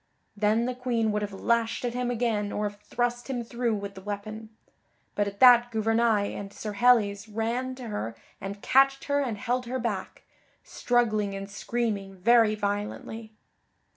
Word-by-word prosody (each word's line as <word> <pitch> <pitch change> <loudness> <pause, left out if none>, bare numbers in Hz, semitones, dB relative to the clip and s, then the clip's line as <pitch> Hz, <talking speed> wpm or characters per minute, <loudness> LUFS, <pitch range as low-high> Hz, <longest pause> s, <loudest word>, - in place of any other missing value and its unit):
Then 215 +3 +2
the 250 - -1
Queen 240 -3 0
would 210 0 -1
have 205 -1 -3
lashed 230 +4 0
at 240 - -2
him 250 0 -1
again 220 -4 0
or 210 0 -1
have 205 0 -9
thrust 240 +2 -2
him 245 -3 -2
through 235 -1 -1
with 200 -1 -5
the 190 - -10
weapon; 215 +2 -6 0.6
but 205 0 0
at 200 0 -7
that 245 -1 +8
Gouvernail 225 -2 +1
and 200 -1 -6
Sir 210 +1 -6
Helles 210 -2 +3
ran 235 +4 -2
to 250 -3 -8
her 115 - -4 0.3
and 200 +1 -6
catched 270 +1 +4
her 285 0 +1
and 240 -6 -2
held 250 +1 -2
her 255 +2 -2
back, 225 -6 -4 0.4
struggling 215 -5 0
and 195 0 -5
screaming 200 -1 -3
very 225 +3 +4
violently. 210 +2 -4
225 Hz, 170 wpm, -27 LUFS, 205-240 Hz, 0.6 s, that